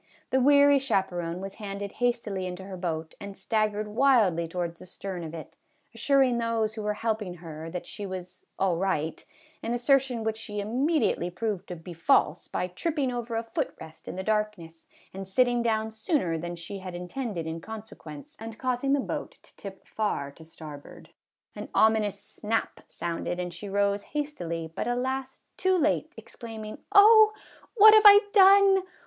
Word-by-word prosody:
The 265 - +3
weary 285 +1 +6
chaperon 185 -8 -1
was 195 0 -6
handed 200 -1 -5
hastily 225 -6 -1
into 180 +1 -7
her 190 0 -8
boat, 165 -3 -4
and 200 -1 -8
staggered 215 -1 -1
wildly 210 -8 +3
towards 170 0 -4
the - - -12
stern 185 -1 -6
of 160 0 -7
it, 160 - -10 0.4
assuring 255 0 +2
those 225 -2 0
who 220 - -6
were 210 0 -1
helping 215 -4 -2
her 165 -2 -8
that 180 +1 -6
she 205 - -7
was 185 -1 -8
" - - -48
all 185 -3 +1
right," 165 -4 -1 0.4
an 235 +1 -2
assertion 250 -1 +2
which 220 0 -2
she 210 -2 -6
immediately 245 - 0
proved 195 +1 -3
to 180 - -6
be 170 +2 -10
false 165 0 +2
by - - -2
tripping 270 - -2
over 240 -1 -4
a 225 - -1
foot 255 +5 -3
rest 160 0 -13
in - - -5
the 190 - -4
darkness, 210 -6 -3 0.3
and 195 0 -7
sitting 245 +4 +2
down 220 -1 0
sooner 220 - -1
than 175 +2 -5
she 185 +4 -7
had 185 -1 -7
in 180 0 -6
tended 210 -7 -4
in 160 +1 -5
consequence, 210 -9 -10
and 225 0 -8
causing 255 +1 0
the 285 - +3
boat - - -5
to - - -19
tip 195 -1 -10
far 175 -10 -2
to 160 - -15
starboard. 155 -3 -12 0.4
An - - -7
ominous 215 -2 +3
snap 215 +2 -3
sounded 170 +1 -4
and 180 -1 -4
she 205 - -7
rose 200 0 +1
hastily, 175 - -4
but, - - -3
alas! 260 +2 -2 0.2
too 375 0 +2
late, 335 - +1
exclaiming, 220 -2 -9
" - - -49
Oh, 430 +1 +8 0.4
what 430 -1 +9
have 435 0 +7
I 405 0 +10
done 390 -1 +7
210 Hz, 180 wpm, -27 LUFS, 180-245 Hz, 0.4 s, I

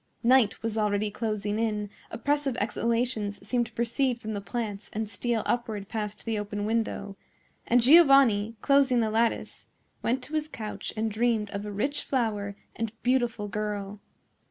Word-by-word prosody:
Night 235 -4 +4
was 225 -1 -1
already 210 0 +1
closing 210 -1 -2
in; 210 -2 -1 0.2
oppressive 275 +2 -1
exhalations 225 -2 -1
seemed 240 +1 +1
to - - -17
proceed 240 +2 0
from 220 -1 -5
the 205 - -3
plants 210 -2 -4
and 220 +1 -2
steal 225 +2 -1
upward 220 -5 -2
past 210 -2 -4
the 225 -2 -1
open 205 0 -3
window; 220 -3 -1 0.5
and 240 0 +4
Giovanni, 270 -8 +6
closing 275 -3 +4
the 220 -2 +1
lattice, 225 +1 -1 0.3
went 255 +2 0
to 300 - -11
his 310 -1 0
couch 220 -8 -6
and 220 0 0
dreamed 220 -1 +1
of 200 +1 -4
a - - -4
rich 275 +9 -1
flower 210 -6 -1 0.2
and 225 -1 -2
beautiful 240 -4 +1
girl. 205 0 -4
225 Hz, 155 wpm, -28 LUFS, 210-245 Hz, 0.5 s, Giovanni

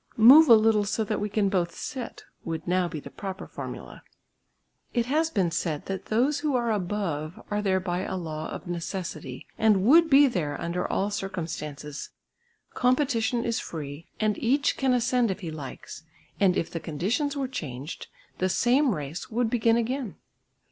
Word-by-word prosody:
"Move 270 +7 +9
a 230 - +11
little 215 -1 +4
so 215 +2 -1
that 215 0 -2
we 210 +1 -2
can 205 0 +1
both 175 -4 0
sit" 255 -2 -6 0.2
would 165 0 -5
now 180 0 +2
be 165 -3 -5
the - - -11
proper 190 -1 -6
formula. - - -8 0.9
It 235 -1 +2
has 310 +5 +1
been 190 - 0
said 160 -2 -2
that 195 0 -4
those 260 +7 +2
who 290 -2 0
are 235 -2 +1
"above" 180 -6 -2
are 210 0 0
there 190 -2 +2
by 180 -1 -2
a 190 0 -3
law 155 -3 -5
of - - -7
necessity 170 -6 -5
and 210 -4 +4
would 325 +6 +6
be 285 0 +7
there 165 - -1
under 170 +1 -2
all 200 +2 0
circumstances; 160 -7 -5 0.6
competition 250 -2 +1
is 230 -1 0
free 150 0 -7
and 215 -2 +1
each 275 +5 +2
can 265 -1 +1
ascend 245 -1 +2
if 190 +2 -3
he 165 -3 -5
likes, 145 -4 -8 0.4
and 190 -3 +4
if 165 - -2
the 165 - -3
conditions 215 - -1
were 270 -2 -1
changed, 150 - -6 0.3
the 185 - +1
same 250 +4 +3
race 150 - -6
would 230 0 0
begin 230 -1 +3
again. 240 -1 -2
205 Hz, 175 wpm, -27 LUFS, 170-240 Hz, 0.9 s, a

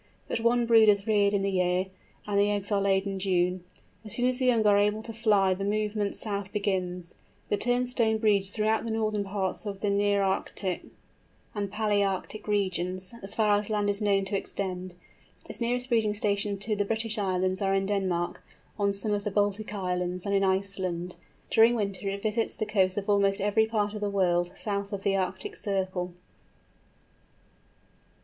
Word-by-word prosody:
But - - -2
one 235 +1 +2
brood 225 -2 +6
is 200 -1 +3
reared 205 -2 +3
in 200 -1 0
the 195 - 0
year, 180 0 +1 0.4
and 205 -1 0
the 205 +1 +3
eggs 205 0 -2
are 200 -1 +2
laid 195 0 +2
in 195 -1 -3
June. 180 -1 +1 0.4
As 215 0 +2
soon 245 - +1
as 255 0 +1
the 255 - +1
young 230 -3 +3
are 205 -1 +6
able 210 +2 +2
to 225 - -7
fly 210 -4 +3
the 190 +2 -4
movement 210 0 -1
south 200 -2 -3
begins. 180 -4 -2 0.4
The 205 - +1
Turnstone 245 -2 +1
breeds 200 -3 +2
throughout 215 +1 +1
the 230 - -3
northern 215 -2 0
parts 195 -1 -2
of 195 -1 -5
the 205 - +1
Nearctic 200 -2 0 0.6
and 200 -2 -3
Palæarctic 205 -1 -1
regions, 185 -1 -1
as 195 - -3
far 210 -2 +3
as 205 - -7
land 205 -1 +1
is 200 +1 -1
known 200 -2 +2
to 195 - -2
extend. 185 -2 -4 0.5
Its - - -7
nearest 245 +2 -1
breeding 220 -3 +2
stations 200 -1 -1
to 215 -1 0
the 205 - +1
British 220 +1 -2
Islands 185 -1 0
are 195 0 +2
in 195 0 +1
Denmark, 185 -4 -1 0.4
on 200 -1 +2
some 200 +2 -2
of 205 -1 0
the 210 - -1
Baltic 205 +1 0
Islands, 180 -2 -2
and 200 - -1
in 195 0 +3
Iceland. 190 -2 -1 0.4
During 230 +2 +6
winter 200 -2 -2
it 200 0 -5
visits 225 +1 0
the 215 - -2
coasts 190 -3 +1
of 200 - -3
almost 200 -1 +2
every 210 +2 +2
part 210 -2 -1
of 210 - -6
the 205 - 0
world, 175 -3 +1
south 200 -1 -3
of 195 -1 -4
the 195 - +2
Arctic 190 0 -3
circle. 185 -3 -2
200 Hz, 185 wpm, -28 LUFS, 190-215 Hz, 0.6 s, brood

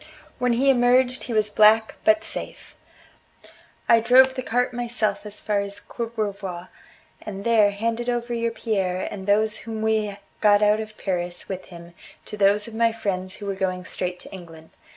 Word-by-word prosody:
When 250 -1 +2
he 270 +4 +4
emerged 250 0 +2
he 240 - -4
was 215 -1 +1
black 215 +1 +5
but 215 0 +4
safe. - - -6 1.1
I 230 - +6
drove 260 +3 +5
the 260 - -4
cart 245 0 0
myself 220 -4 -2
as 210 - -7
far 210 -1 -1
as 200 0 -4
Courbevoie, 205 -6 -5 0.5
and 200 -2 -7
there 220 -3 +4
handed 230 +4 -2
over 240 0 -2
your 230 0 0
Pierre 195 -5 -2
and 190 -1 -7
those 215 +1 +3
whom 220 -1 -6
we 215 -2 0 0.2
got 205 -1 +4
out 210 +1 +4
of 215 -1 -7
Paris 175 -2 -3
with 190 -1 -6
him 170 -1 -13 0.3
to - - -7
those 205 +1 +3
of 230 - -9
my 230 +1 +2
friends 190 -4 -3
who 205 - -9
were 200 - -2
going 185 -1 -3
straight 180 -1 -4
to - - -11
England. 165 -3 -12
215 Hz, 175 wpm, -23 LUFS, 195-230 Hz, 1.1 s, I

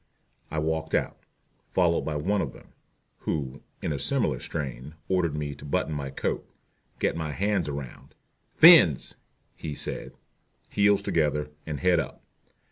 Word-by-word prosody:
I 80 - -4
walked 80 +1 -1
out, - - 0 0.5
followed 85 -2 +2
by 80 - -3
one 95 +7 +1
of - - -3
them, - - -16 0.5
who, 70 -3 -3 0.2
in 80 - 0
a 70 - -3
similar 95 - 0
strain, 70 0 -5
ordered 90 -5 +1
me 75 -1 -3
to 70 - -13
button 75 +2 -1
my 70 -2 -3
coat, 70 - -2 0.5
get - - 0
my 80 -2 -3
hands 100 -5 0
around 70 -3 -7 0.4
"fins" 160 - +8 0.4
he 75 -2 -5
said - - -6 0.5
heels 100 0 +3
together, 75 -2 0 0.2
and 75 -3 -4
head 90 -2 +4
up. - - -5
75 Hz, 145 wpm, -27 LUFS, 70-90 Hz, 0.5 s, fins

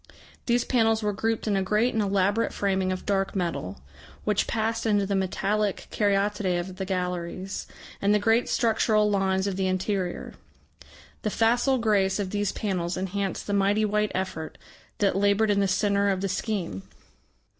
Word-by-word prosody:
These 240 0 +2
panels 225 -3 +2
were 210 0 0
grouped 225 +2 -1
in 210 -2 +1
a 195 - +1
great 210 +6 +1
and 220 - +1
elaborate 200 +2 +1
framing 190 -2 0
of 185 - -4
dark 195 -1 0
metal, 170 - -3 0.4
which 210 -1 +1
passed 225 0 -1
into 205 -2 +2
the 200 - -2
metallic 195 +2 -1
caryatidae 200 -3 +1
of 185 +1 -6
the 190 - -3
galleries, 180 0 -3 0.3
and 200 - +3
the 210 - +5
great 225 +3 +2
structural 220 -2 +2
lines 190 -1 +1
of 195 -2 -2
the 190 -1 0
interior. 185 -1 -2 0.9
The 215 - -1
facile 240 +5 +2
grace 205 -5 +2
of 195 -3 -3
these 205 -1 0
panels 180 -5 -2
enhanced 190 +1 -3
the 205 - -2
mighty 200 +2 +2
white 210 0 0
effort 185 -4 -4 0.4
that 200 -3 +2
laboured 205 +2 +3
in 200 - +2
the 200 - +2
centre 200 +1 +2
of 190 -1 0
the 195 - -1
scheme. 180 - -2
200 Hz, 165 wpm, -26 LUFS, 190-210 Hz, 0.9 s, the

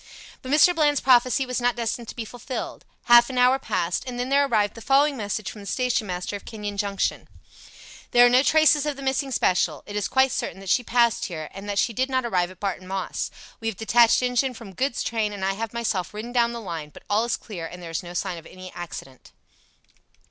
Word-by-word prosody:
But 260 - -6
Mr. 305 +4 +6
Bland's 295 -4 +2
prophecy 255 0 +4
was 250 -1 -3
not 245 0 +2
destined 235 0 -3
to - - -8
be 230 - -5
fulfilled. 245 +3 -6 0.2
Half 240 0 +7
an 255 - -5
hour 250 +2 +4
passed, 170 -8 -1
and 245 -1 -5
then 250 +1 -2
there 280 +1 +3
arrived 210 -5 +1
the 230 - -11
following 280 +4 +3
message 210 -3 -3
from 210 - -11
the 200 - -10
station 250 0 0
master 180 +2 -4
of 200 - -7
Kenyon 210 -2 -6
Junction 200 -1 -2 0.8
"There 245 0 +6
are - - +6
no 250 +1 +6
traces 300 0 +4
of 295 - -1
the 275 - -9
missing 270 +1 0
special. 175 - +1
It 205 - -8
is 210 -2 0
quite 265 0 +3
certain 190 - -3
that 195 -1 -8
she 250 - +4
passed 235 -1 +2
here, 155 -4 -6
and 195 +1 -8
that 200 - -2
she 230 +4 +1
did 260 +5 0
not 260 -1 0
arrive 180 -6 0
at 185 -1 -14
Barton 190 -2 -3
Moss. 190 0 -3 0.3
We 225 - -4
have 225 -4 -2
detached 230 +2 +4
engine 250 +1 +1
from 215 -4 -10
goods 260 +5 -1
train, 220 -2 -1
and 195 -2 -4
I 195 - +1
have 220 +1 -4
myself 210 -5 -2
ridden 225 +3 -6
down 235 -1 +2
the 235 - -5
line, 165 -7 -6
but - - -15
all 210 +2 +2
is 240 - -1
clear, 175 -7 -7
and 180 - -10
there 170 -2 -8
is 165 - -2
no 175 0 -10
sign 180 -1 -2
of 165 - -15
any 185 0 -11
accident." 150 -6 -9
230 Hz, 235 wpm, -24 LUFS, 195-255 Hz, 0.8 s, Half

